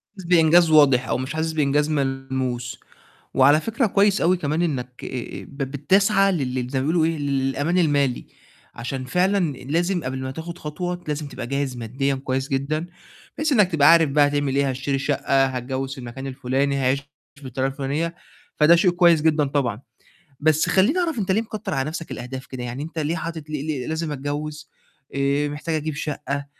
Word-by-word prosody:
حاسس 190 - -10
بإنجاز 170 -1 +5
واضح 140 -5 +5
أو - - 0
مش 130 +3 -4
حاسس 160 +1 -1
بإنجاز 150 0 +1
ملموس، 130 -3 -2 0.5
وعلى 145 +4 +5
فكرة 230 - 0
كويس 200 -1 +3
أوي 180 +2 +3
كمان 155 0 -1
إنّك 125 -7 -3
آآ 125 -2 -6
ب 140 - -14
بتسعى 195 +9 +2
لل 130 -6 -2
زي 130 0 -2
ما 140 - -2
بيقولوا 160 -1 +2
إيه، 165 -1 0
ل - - -5
للأمان 140 +5 0
المالي، 145 -6 +1 0.5
عشان 130 +2 -5
فعلًا 180 +2 +1
لازم 170 +6 -1
قبل 130 +1 -3
ما 130 - -4
تاخُد 170 +4 -7
خطوة 175 +4 -5
لازم 150 0 -3
تبقى 130 -3 -7
جاهز 140 -1 -2
مادّيًا 130 +4 -1
كويس 130 0 -3
جدًا، 150 +5 -1 0.5
بحيث 305 0 0
إنّك 210 -7 +4
تبقى 150 -2 +6
عارف 165 -3 +5
بقى 145 0 +4
هتعمل 145 -2 -1
إيه، 140 -1 +2
هاشتري 135 +2 -2
الشَقّة، 135 -1 +1
هاتجوِّز 130 +1 -3
في - - -11
المكان 125 +2 -7
الفُلاني، 135 +2 -1
هاعيش 135 0 +1 0.4
بالطريقة 130 0 -2
الفُلانية، 145 +5 -2 0.4
فده 155 +3 +6
شيء 180 +1 +3
كويس 175 -3 +4
جدًا 155 -2 +3
طبعًا. 130 -5 -1 0.6
بس 155 +1 +3
خلّيني 220 - +3
أعرف 330 -7 0
أنت 195 -3 -1
ليه 220 - +2
مكتر 215 -2 -5
على 135 +2 -1
نَفْسك 165 +1 -6
الأهداف 130 +1 -6
كده؟ 125 -1 -7
يعني 125 +3 -5
أنت 165 +1 -7
ليه 160 +2 -1
حاطط 160 -2 -6
ليه 150 -2 -3
ليه 140 -5 -3
لازم 160 -1 -2
أتجوِّز، 145 +2 -5 0.4
آآ 140 +1 +1
محتاج 150 +3 -4
أجيب 155 -1 -2
شَقّة، 140 -1 -4
145 Hz, 185 wpm, -23 LUFS, 135-165 Hz, 0.6 s, تبقى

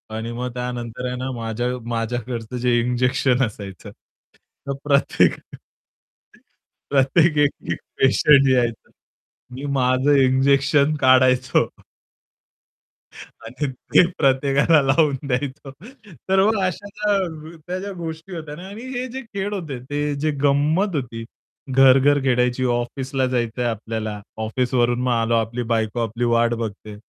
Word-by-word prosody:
आणि 115 +1 -4
मग 125 +1 -4
त्यानंतर 125 -1 -5
आहे 125 - -3
ना, 130 +1 -4
माझ्या 115 +1 -3 0.2
माझ्याकडचं 120 +1 -3
जे 120 -1 +2
इंजेक्शन 125 +1 +1
असायचं 100 -5 -9 0.8
तर 140 - -1
प्रत्येक 140 -1 +3 1.6
प्रत्येक 150 +4 +3
एक 145 -1 +4 0.2
एक - - -3 0.2
पेशंट 135 +1 +5
यायचं. 120 -3 0 0.7
मी 135 +3 -6
माझं 130 +2 +2
इंजेक्शन 140 +2 +3
काढायचो 130 -1 +4 1.8
आणि 125 +6 -4 0.3
ते - - +7
प्रत्येकाला 140 +3 +3
लावून 140 +1 +2
द्यायचो. 135 +1 -3 0.6
तर 190 0 +4
मग 220 -1 +2
अशा 185 +2 -3 0.8
त्या 180 +1 -3
ज्या 200 +1 -6
गोष्टी 165 +1 -7
होत्या 155 -3 -7
ना. 180 +4 -10
आणि 205 +4 -9
हे 250 +1 -3
जे 265 +2 -5
खेळ 205 -4 -5
होते 155 -10 -5
ते 145 0 -1
जे 155 +1 0
गंमत 155 +7 +2
होती 115 -4 -4 0.5
घर-घर 135 +2 +5
खेळायची 125 -1 +1
ऑफिसला 130 +2 -1
जायचंय 120 -1 -2
आपल्याला, 110 -2 -3 0.2
ऑफिसवरून 120 +1 0
मग 125 - 0
आलो 115 -1 +1
आपली 115 +2 -1
बायको 110 +1 -1
आपली 115 +2 -4
वाट 115 0 +2
बघते. 105 -1 -7
130 Hz, 125 wpm, -21 LUFS, 120-145 Hz, 1.8 s, ते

